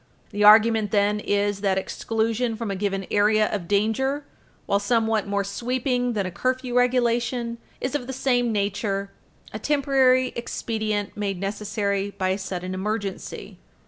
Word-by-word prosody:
The 205 0 -1
argument, 220 0 +6
then, 205 +1 +2
is 205 -1 0
that 195 -2 +1
exclusion 225 +4 -1
from 220 -2 -4
a - - -2
given 195 0 -2
area 215 +1 +4
of 190 -5 -3
danger, 225 +9 0 0.4
while 200 - +2
somewhat 220 0 +1
more 200 0 0
sweeping 245 +4 -1
than 205 -3 -1
a 185 - -4
curfew 255 +5 -2
regulation, 240 -1 +1 0.2
is 255 - -3
of 270 -4 -2
the - - -3
same 245 -2 +1
nature 200 -1 -1 0.4
a - - -4
temporary 265 -3 +3
expedient 220 -3 -3
made 200 -3 -2
necessary 200 0 -2
by 185 -1 0
a 190 +2 0
sudden 185 -1 -4
emergency. 200 +1 -4
215 Hz, 145 wpm, -24 LUFS, 200-245 Hz, 0.4 s, argument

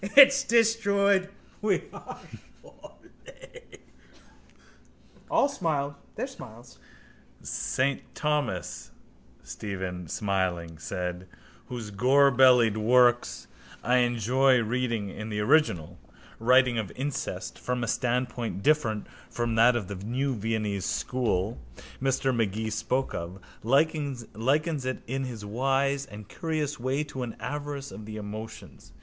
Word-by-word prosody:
It's 275 -1 +9
destroyed 200 -5 +3 0.3
we 210 -3 +1
are - - -9 0.4
surely! - - -16 1.5
All - - +4
smiled 155 - -1 0.2
their - - -2
smiles. 120 - -12 0.6
—Saint 135 +1 -1
Thomas, 150 -5 -2 0.5
Stephen 95 -4 -5
smiling 90 -4 -2
said, 90 +2 -4 0.4
whose 115 -4 -6
gorbellied 125 -1 +5
works 120 - +3 0.4
I 125 +1 +3
enjoy 125 +1 +3
reading 115 -3 -1
in 110 +3 -7
the 105 -1 -2
original, 105 - +2 0.4
writing 125 0 +4
of 105 -4 -4
incest 135 +2 -4
from 125 -1 -2
a - - -2
standpoint 125 -3 -1
different 140 -9 +2 0.2
from 120 -1 -2
that 115 +2 +5
of 110 -6 -2
the 100 - -5
new 130 +5 -1
Viennese 105 -3 -2
school 110 - -1 0.4
Mr 135 -1 +1
Magee 110 0 -1
spoke 125 +5 -1
of, 85 +3 -5 0.2
likens 140 0 +1
it 135 +3 0
in 135 +2 -2
his 115 -5 -7
wise 135 +5 0
and 105 -3 -10
curious 155 -3 -3
way 130 +4 0
to 135 -3 -7
an 120 -3 -4
avarice 145 +3 -5
of 105 - -9
the 110 0 -6
emotions. 110 -8 -8
125 Hz, 115 wpm, -28 LUFS, 110-140 Hz, 1.5 s, It's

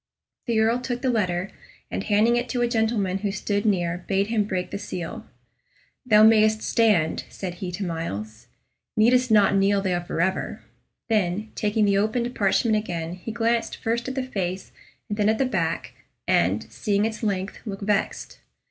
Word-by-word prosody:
The 230 -2 +2
Earl 225 +2 +3
took 245 0 -4
the 260 - +2
letter, 185 -4 -1 0.4
and - - -2
handing 215 +3 +3
it 240 0 -1
to 245 -2 0
a - - +2
gentleman 220 -5 0
who 200 0 -1
stood 205 +2 -1
near, 180 -3 0
bade 195 0 +2
him 220 -3 +1
break 185 -3 -3
the 200 - -4
seal. 205 +3 -6 0.8
"Thou 215 -2 +6
mayst 215 0 +5
stand," 210 -9 +2
said 185 -3 -6
he 180 -2 -3
to 195 +2 -3
Myles; 115 - -5 0.5
"needst 250 +3 +4
not 205 -3 +5
kneel 195 +1 +3
there 185 -3 0
forever." 175 +2 -2 0.4
Then, 215 -1 0
taking 210 0 +1
the 200 -1 +3
opened 235 +4 0
parchment 215 +2 +2
again, 170 -5 -3
he 185 +5 -7
glanced 230 +1 0
first 235 +2 -2
at 260 - -4
the 265 - -1
face 190 -7 -4 0.4
and 210 +1 -4
then 210 0 +3
at 220 - +2
the 270 - +2
back, 170 -9 -2 0.3
and, - - +2
seeing 205 -1 0
its 225 0 -3
length, 195 -3 -2
looked 195 -1 -5
vexed. 205 0 -1
210 Hz, 175 wpm, -24 LUFS, 185-225 Hz, 0.8 s, Thou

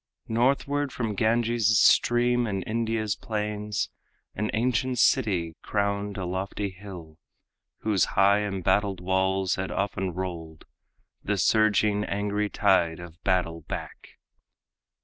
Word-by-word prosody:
Northward 140 +4 +1
from 115 -4 -3
Ganges' 110 0 +2
stream 120 0 +4
and 95 -3 -2
India's 110 -2 -1
plains 105 -2 -3 0.4
An 105 +2 -2
ancient 125 +2 0
city 95 -10 +2
crowned 100 0 -2
a 95 - -3
lofty 95 +2 -3
hill, 90 -5 -11 0.6
Whose 105 -4 +2
high 100 +1 +5
embattled 100 -1 0
walls 95 +1 0
had 95 0 -3
often 95 -1 -2
rolled 85 -4 -6 0.6
The 105 +1 -1
surging, 105 0 +3
angry 105 +1 -1
tide 95 -7 +2
of 85 0 -11
battle 90 -4 0
back. - - -8
100 Hz, 110 wpm, -26 LUFS, 95-110 Hz, 0.6 s, high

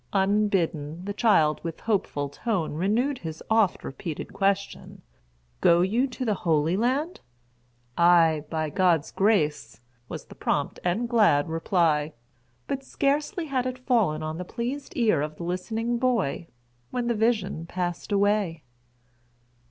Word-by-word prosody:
Unbidden, 190 -5 0
the 205 - -3
child 160 -9 +3
with 165 -1 -6
hopeful 190 -9 -1
tone 170 - -2
renewed 225 - 0
his 160 -2 -7
oft 220 -4 +3
repeated 150 +3 -6
question, 200 0 -2 0.6
"Go 170 0 +5
you 225 +9 +2
to 255 0 -5
the 215 - +2
Holy 165 -2 +1
Land?" 265 - 0 0.8
"Ay, 165 -3 +5
by 155 -2 -2
God's 170 -2 +2
grace," 155 - +1 0.3
was - - -7
the - - -13
prompt - - -2
and 185 +7 0
glad 210 - +3
reply; 160 -3 +1 0.5
but 275 0 -3
scarcely 295 +7 -1
had 260 -4 -1
it 255 0 -4
fallen 225 - +1
on 155 +2 -4
the - - -3
pleased 245 +8 -5
ear 215 - +3
of 150 +1 -4
the 170 - -8
listening 220 +7 -2
boy, 225 - 0 0.4
when 250 -1 -2
the 235 - +1
vision 210 -7 0
passed 175 +2 -4
away. 200 -5 +1
190 Hz, 135 wpm, -26 LUFS, 160-235 Hz, 0.8 s, Go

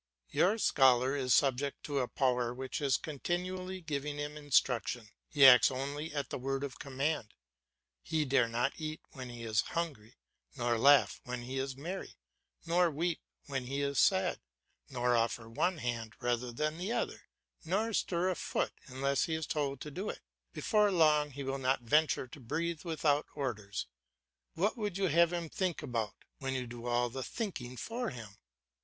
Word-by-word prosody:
Your 200 +5 +3
scholar 130 - +4
is 130 -2 -1
subject 140 +1 +2
to 145 -2 -1
a 125 - 0
power 125 -2 +1
which 130 +4 -4
is 135 -3 +3
continually 185 +5 -3
giving 145 -2 -3
him 145 0 -4
instruction; 125 -5 +1 0.2
he 145 -2 +6
acts 125 -2 +9
only 140 +4 -4
at 140 -3 -3
the - - -3
word 135 +2 -2
of 140 -3 -5
command; 140 -3 -2 0.7
he 155 - 0
dare 130 -3 +3
not 120 +4 0
eat 155 0 -4
when 130 -2 -7
he 120 -1 -8
is 110 -1 +2
hungry, 140 -10 -4 0.4
nor 120 -1 +1
laugh 135 -5 +5
when 125 -1 -5
he 130 +2 -3
is 135 0 -3
merry, 175 +7 -6 0.5
nor 175 +1 +3
weep 165 +2 -1 0.3
when 135 -2 -3
he 140 +2 -2
is 140 -1 0
sad, 95 - +3 0.5
nor 125 -2 +1
offer 115 0 0
one 175 +10 0
hand 120 -4 -3
rather 120 0 -1
than 155 +6 -2
the 190 +5 -2
other, - - -2 0.4
nor 205 +7 0
stir 180 -1 +1
a - - -2
foot - - -1
unless 140 +1 0
he 160 - -1
is 160 -1 -2
told 140 -3 -1
to 150 - -6
do 190 +8 -4
it; - - -6 0.3
before 210 -2 +2
long 155 -4 +4
he 140 0 -6
will 135 0 -2
not 130 -1 +1
venture 150 +4 +3
to 130 +3 -12
breathe 160 +6 -2
without 155 -3 +1
orders. 110 -8 -3 0.7
What 195 +6 +1
would 205 -4 -2
you 195 -2 +1
have 170 +2 +5
him 170 -1 -2
think 180 +1 -2
about, 115 -5 -2 0.2
when 135 0 -2
you 130 -1 -2
do 120 0 -8
all 120 0 +1
the 130 +2 -4
thinking 130 - -4
for 235 - -3
him? 110 -6 -9
140 Hz, 175 wpm, -33 LUFS, 125-160 Hz, 0.7 s, acts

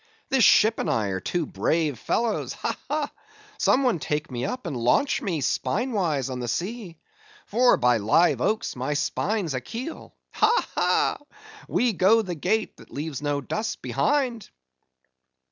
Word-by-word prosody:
This 265 -3 +3
ship 220 +2 +5
and - - -1
I 110 -3 0
are 95 -1 -2
two 170 - -2
brave 155 -7 0
fellows!—Ha, 230 -2 -1
ha! 300 -1 -1 0.5
Some 275 - +3
one 245 -10 +2
take 150 0 -3
me 125 0 -3
up, 255 - -4
and 160 -6 -3
launch 125 - +2
me, 175 -8 -2
spine 205 - -1
wise, 160 - 0
on 125 - -4
the 120 - -4
sea,—for 240 - -1
by 125 -1 +3
live 110 +12 +3
oaks! 215 0 0
my 130 +4 -2
spine's 195 +2 -1
a 130 - -2
keel. 245 - -7 0.2
Ha, 450 +3 +2
ha! - - +2 0.5
we 240 -2 +1
go 210 +5 +4
the 180 -3 -4
gait 190 +8 -1
that - - -16
leaves 145 -1 -5
no 145 -1 -1
dust 220 - -4
behind!" 255 -7 0
185 Hz, 155 wpm, -25 LUFS, 140-235 Hz, 0.5 s, ship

